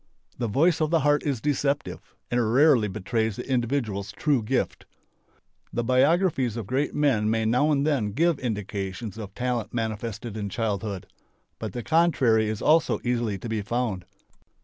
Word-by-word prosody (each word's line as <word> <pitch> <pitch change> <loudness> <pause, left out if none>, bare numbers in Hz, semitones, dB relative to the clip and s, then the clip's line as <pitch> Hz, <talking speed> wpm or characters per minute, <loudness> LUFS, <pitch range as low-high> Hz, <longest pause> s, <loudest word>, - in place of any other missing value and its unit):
The 120 - 0
voice 160 - +2
of 155 - +2
the 165 -1 +2
heart 145 +1 +3
is 135 -6 -2
deceptive 145 0 -1 0.3
and 120 -2 +1
rarely 135 -6 +5
betrays 110 +2 -1
the - - -7
individual's 120 -6 -1
true 145 -5 +1
gift. 105 - -2 0.8
The 120 - -1
biographies 130 - +2
of 115 - -4
great 130 +6 -1
men 130 -8 +2
may 110 0 +1
now 125 +7 +3
and 140 -1 +2
then 125 -10 0
give 165 +4 +2
indications 105 -1 -4
of 100 -2 -8
talent 120 -3 -2
manifested 110 0 -4
in 105 -2 -3
childhood. 105 -3 -3 0.5
But 110 -4 -5
the 120 - -4
contrary 135 -10 +3
is 110 -1 -4
also 160 +1 +3
easily 120 -4 0
to 95 - -7
be 110 -2 -2
found. 110 -3 -2
120 Hz, 160 wpm, -26 LUFS, 110-140 Hz, 0.8 s, rarely